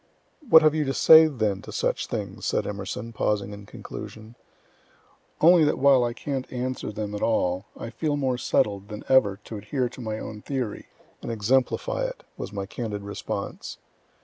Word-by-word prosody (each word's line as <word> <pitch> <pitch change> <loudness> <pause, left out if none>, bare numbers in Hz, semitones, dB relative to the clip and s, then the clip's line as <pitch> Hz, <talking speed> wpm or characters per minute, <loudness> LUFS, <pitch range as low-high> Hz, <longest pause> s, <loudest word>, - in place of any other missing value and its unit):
"What 160 -5 +9
have 155 -1 +5
you 155 -1 +1
to 135 - -2
say 160 0 +8
then 110 -9 -1
to - - -10
such - - -1
things?" - - -4
said - - 0
E., 100 +3 -5
pausing 105 -2 -1
in 100 -1 -11
conclusion. 110 +1 -9 1.1
"Only 170 +1 +7
that 150 - +2
while 135 -2 +5
I 120 0 -1
can't 135 +1 -4
answer 130 -2 -3
them 105 0 -5
at 105 - -4
all, 95 -4 +1
I 115 - -7
feel 150 0 -1
more 130 -3 0
settled 100 -3 0
than 105 0 -7
ever 105 -7 +4
to 110 - -7
adhere 125 +5 -2
to 125 - -11
my 110 -2 -3
own 110 -1 -7
theory, 125 -6 -4 0.3
and - - -5
exemplify 130 - 0
it," - - -6
was - - -6
my 100 -2 -4
candid 105 -1 -5
response. 100 0 -5
115 Hz, 175 wpm, -25 LUFS, 105-135 Hz, 1.1 s, What